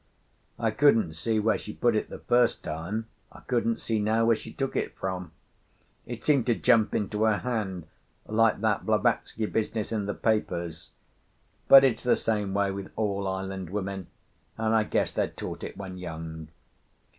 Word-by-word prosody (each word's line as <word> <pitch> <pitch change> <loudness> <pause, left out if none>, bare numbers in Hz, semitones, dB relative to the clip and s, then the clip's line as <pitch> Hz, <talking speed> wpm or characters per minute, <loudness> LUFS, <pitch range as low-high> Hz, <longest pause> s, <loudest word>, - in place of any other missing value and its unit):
I 115 -2 0
couldn't 115 - +3
see 110 +8 0
where 110 +1 +2
she 105 - -7
put 120 -2 +2
it 110 - -1
the - - -7
first 120 -1 +2
time, 85 +9 -4 0.3
I - - -14
couldn't 115 -2 0
see 110 -2 -1
now 110 +2 +2
where 115 0 +5
she - - -9
took 135 -1 -3
it - - -2
from; 90 -3 -4 0.8
it 120 -1 -6
seemed 140 -5 +3
to 120 - +3
jump 110 -1 +3
into 105 0 -1
her 110 -2 +3
hand 105 -9 -3 0.4
like 110 0 +2
that - - +1
Blavatsky 110 - +1
business 110 0 -2
in 105 -3 -1
the 100 - -2
papers. 85 -7 -1 0.8
But 135 0 +10
it's 130 -4 +2
the 125 - +3
same 105 -3 -1
way 100 -1 +2
with 95 0 -6
all 100 -2 -1
island 95 -1 -4
women, 95 -2 -4 0.5
and 110 0 +1
I 110 -1 +3
guess - - 0
they're - - 0
taught - - -7
it - - -7
when 95 -2 -7
young. 80 -2 -7
105 Hz, 175 wpm, -27 LUFS, 95-115 Hz, 0.8 s, But